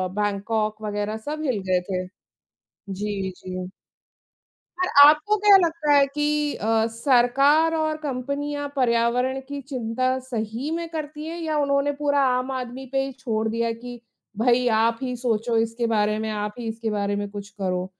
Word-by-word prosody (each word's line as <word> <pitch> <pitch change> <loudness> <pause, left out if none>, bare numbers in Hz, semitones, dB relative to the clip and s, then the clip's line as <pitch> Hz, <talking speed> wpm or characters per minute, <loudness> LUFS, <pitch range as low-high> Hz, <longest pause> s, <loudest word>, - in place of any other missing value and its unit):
Bangkok 215 +1 -1
वगैरह 210 +1 -2
सब 305 +1 -4
हिल 250 -7 0
गए 185 -1 +2
थे। 185 -1 -2 0.9
जी, 200 -1 -3
जी। 185 0 -6 1.1
और 370 - +2 0.2
आपको 310 +8 +4
क्या 410 -1 +7
लगता 330 -4 +1
है 285 -1 +6
कि 295 0 0
अ, 220 +1 +1
सरकार 275 +6 +3
और 310 -1 0
कंपनियाँ 285 +2 -3
पर्यावरण 250 +1 +1
की 285 0 -4
चिंता 255 -1 -1
सही 240 +2 -4
में 335 0 -3
करती 305 -1 -6
हैं 335 +2 -5
या 310 -2 -1
उन्होंने 280 0 +2
पूरा 285 -1 +2 0.2
आम 255 +1 -3
आदमी 255 0 -5
पे 270 0 +1
ही 270 - -5
छोड़ 225 -4 -1
दिया 230 +1 0
कि 240 +1 -8 0.4
भाई 245 +2 +3
आप 230 +1 +2
ही 250 -1 -2
सोचो 235 -1 -1
इसके 230 +1 0
बारे 215 -1 +1
में, 220 0 -3
आप 210 0 -3
ही 235 - -5
इसके 225 0 -3
बारे 205 -1 -1
में 205 0 -3
कुछ 205 -1 -7
करो? 185 -3 -2
245 Hz, 165 wpm, -24 LUFS, 215-285 Hz, 1.1 s, क्या